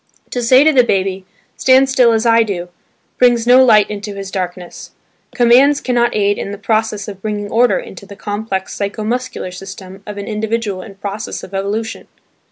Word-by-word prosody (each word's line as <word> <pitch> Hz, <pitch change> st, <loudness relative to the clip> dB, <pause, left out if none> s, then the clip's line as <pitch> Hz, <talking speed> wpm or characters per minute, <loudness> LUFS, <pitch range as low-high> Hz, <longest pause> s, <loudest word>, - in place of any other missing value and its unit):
To 245 Hz, -, -2 dB
say 255 Hz, +3 st, +5 dB
to 310 Hz, 0 st, +4 dB
the 255 Hz, -2 st, +5 dB
baby, 190 Hz, -3 st, -1 dB, 0.3 s
"Stand 265 Hz, +1 st, +4 dB
still 255 Hz, -3 st, +4 dB
as 225 Hz, 0 st, 0 dB
I 230 Hz, 0 st, +5 dB
do," 185 Hz, -5 st, -3 dB, 0.5 s
brings 240 Hz, -2 st, +3 dB
no 250 Hz, +2 st, +6 dB
light 215 Hz, -5 st, +5 dB
into 205 Hz, -1 st, -6 dB
his 195 Hz, -1 st, -7 dB
darkness; 180 Hz, -1 st, -6 dB, 0.4 s
commands 260 Hz, +4 st, +5 dB
cannot 240 Hz, -2 st, 0 dB
aid 205 Hz, -1 st, +1 dB
in 200 Hz, -, -5 dB
the 205 Hz, -, -6 dB
process 215 Hz, 0 st, -1 dB
of 195 Hz, -2 st, -9 dB
bringing 205 Hz, -1 st, -4 dB
order 240 Hz, +2 st, +3 dB
into 190 Hz, +2 st, -9 dB
the 200 Hz, -, -11 dB
complex 205 Hz, -2 st, -4 dB
psycho 205 Hz, +2 st, -4 dB
muscular 250 Hz, -3 st, -3 dB
system 190 Hz, +1 st, -10 dB
of 210 Hz, -1 st, -7 dB
an 200 Hz, -, -5 dB
individual 215 Hz, -2 st, -3 dB
in 195 Hz, +1 st, -11 dB
process 200 Hz, +1 st, -6 dB
of -, -, -11 dB
evolution. 205 Hz, +3 st, -4 dB
210 Hz, 180 wpm, -16 LUFS, 195-240 Hz, 0.5 s, no